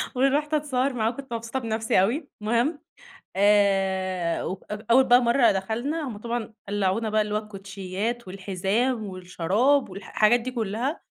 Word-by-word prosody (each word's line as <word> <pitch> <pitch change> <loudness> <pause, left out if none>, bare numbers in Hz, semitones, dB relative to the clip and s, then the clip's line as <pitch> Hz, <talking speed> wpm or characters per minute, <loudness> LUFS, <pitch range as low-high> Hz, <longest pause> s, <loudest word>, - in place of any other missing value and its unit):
ورُحت 285 +4 +1
أتصوّر 275 -3 0
معاه 225 -2 +1
وكنت 265 0 -7
مبسوطة 230 +3 -3
بنفسي 225 -4 +1
أوي 275 - -1
المهم، 240 +8 +1 0.6
آآ 190 -3 +2
و - - -2 0.2
أو 210 - -2
أول 260 +2 +7
بقى 245 0 +6
مرّة 235 +1 +4
دخلنا، 240 +10 -2
هم 210 -4 -7
طبعًا 230 -1 -4
قلّعونا 205 +2 0
بقى 215 0 +3
اللي 210 0 -4
هو - - +2
الكوتشيّات 200 +2 -5
والحزام 200 +5 -1
والشراب 190 +9 +1
والح 195 +1 -9
حاجات 235 +3 +4
دي 255 - -4
كُلّها 235 - -2
220 Hz, 150 wpm, -25 LUFS, 195-250 Hz, 0.6 s, أول